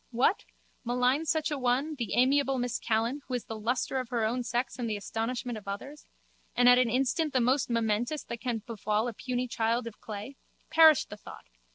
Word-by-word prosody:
What? 260 - +1 0.4
Malign 250 +5 +1
such 315 0 +1
an 290 -3 -2
one, 255 +5 +1
the 235 -8 -3
amiable 270 +1 +3
Miss 245 -1 -1
Callan, 230 +6 0
who 255 - -2
is 245 - -4
the 225 - -6
lustre 245 +4 -1
of 255 -2 -5
her 235 -3 0
own 240 +3 0
sex 240 +1 -2
and 235 -2 -2
the 210 - -1
astonishment 225 +3 -3
of 205 - -20
ours? 270 +10 -7 0.5
And 245 0 +4
at 245 0 +8
an 250 -2 +3
instant 270 +6 0
the 260 - +3
most 255 +3 +2
momentous 230 +5 0
that 235 - -7
can 235 -4 -2
befall 215 0 -1
a 240 - -4
puny 250 +2 -3
child 230 +1 0
of 230 -2 -9
clay? 215 +6 -7 0.3
Perish 320 -2 +7
the 210 - -10
thought! - - -12
245 Hz, 205 wpm, -29 LUFS, 225-265 Hz, 0.5 s, at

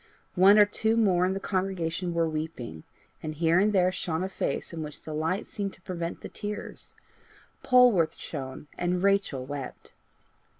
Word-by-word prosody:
One 195 +3 +7
or 210 - +8
two 220 +2 0
more 185 -5 +3
in 190 - 0
the - - -2
congregation 185 -3 -2
were 165 -1 +2
weeping, 155 - -5 0.4
and 155 -1 -5
here 165 +2 +3
and 210 +2 +3
there 185 -2 +3
shone 165 -2 -2
a 190 - -2
face 190 - -3
in 165 - -4
which 150 -1 -7
the 155 - -6
light 160 +6 -1
seemed 200 -5 -4
to - - -17
prevent 170 -2 -4
the - - -6
tears. 210 0 -7 0.7
Polwarth 240 -11 +4
shone 135 -2 -7
and 180 +1 0
Rachel 195 -10 +1
wept. 140 -1 -7
180 Hz, 170 wpm, -28 LUFS, 160-195 Hz, 0.7 s, or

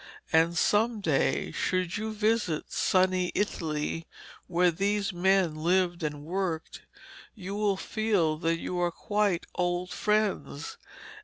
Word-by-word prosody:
And 165 +2 +4
some 220 +5 +2
day 160 -8 +1
should 185 -1 -1
you 220 +1 -3
visit 215 -6 0
sunny 185 -1 +2
Italy, 165 -4 -2 0.4
where 180 0 +3
these 200 +3 0
men 185 -1 +3
lived 175 +2 +1
and 150 -2 -3
worked, 175 -2 -3 0.5
you 195 -2 -6
will 205 -1 +1
feel 195 -8 0
that 165 0 +1
they - - -6
are 175 -1 0
quite 205 0 0
old 180 0 -1
friends. 210 -10 -1
180 Hz, 125 wpm, -28 LUFS, 165-205 Hz, 0.5 s, And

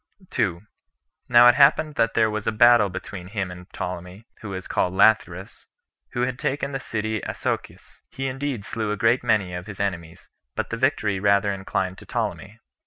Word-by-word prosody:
2. 90 -9 0 0.7
Now 120 0 +8
it 120 - +8
happened 145 +3 +4
that 115 -5 0
there 110 -1 +4
was 110 -1 -4
a - - +3
battle 120 -1 +5
between 90 0 -7
him 100 -2 -3
and 90 0 -11
Ptolemy, 90 +3 -6 0.2
who 110 - -7
was 95 -1 -6
called 90 0 0
Lathyrus, 95 -3 +2 0.5
who 120 - -1
had 125 +1 -1
taken 140 0 -2
the 135 - -3
city 110 -3 -3
Asochis. - - -5
He 135 - -5
indeed 135 -4 -3
slew 110 -2 -3
a 105 - -2
great 115 +4 +2
many 105 -6 +1
of 90 +2 -6
his 105 -3 -9
enemies, 85 -4 -4 0.3
but - - -3
the - - -1
victory 110 -7 +1
rather 100 0 +2
inclined 95 -1 -3
to - - -15
Ptolemy. 105 +3 -4
105 Hz, 180 wpm, -24 LUFS, 95-120 Hz, 0.7 s, Now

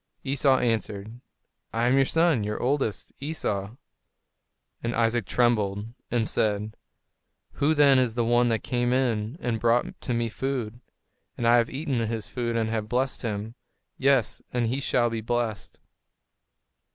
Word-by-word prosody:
Esau 135 0 +3
answered, 110 -1 -2 0.5
"I 115 +2 0
am 125 - +3
your 135 0 +4
son; 160 -6 +2
your 105 +1 -3
oldest 130 -5 -1
son, - - -32
Esau." 110 -9 -3 1.1
And 115 +1 -2
Isaac 115 -3 +1
trembled, 110 -3 +1 0.2
and 115 -3 0
said, 105 0 0 0.8
"Who 155 +3 +1
then 140 -3 +6
is 120 -3 0
the 120 -1 +1
one 120 +1 +3
that 115 -1 0
came 120 0 0
in 120 -1 0
and 115 -2 -2
brought 120 +2 +1
to 125 - -2
me 115 0 0
food? 120 -1 -3 0.6
and 120 - 0
I 120 +1 +6
have 115 -1 +2
eaten 140 -2 -2
his 115 -1 -2
food 120 -2 -3
and 115 -1 +1
have 110 -1 -2
blessed 130 +2 0
him; 110 -1 -4 0.4
yes, 135 -4 +2
and 120 -1 0
he 125 +4 -1
shall 120 -3 +1
be 115 -1 -3
blessed." 115 -2 -3
120 Hz, 155 wpm, -26 LUFS, 110-130 Hz, 1.1 s, then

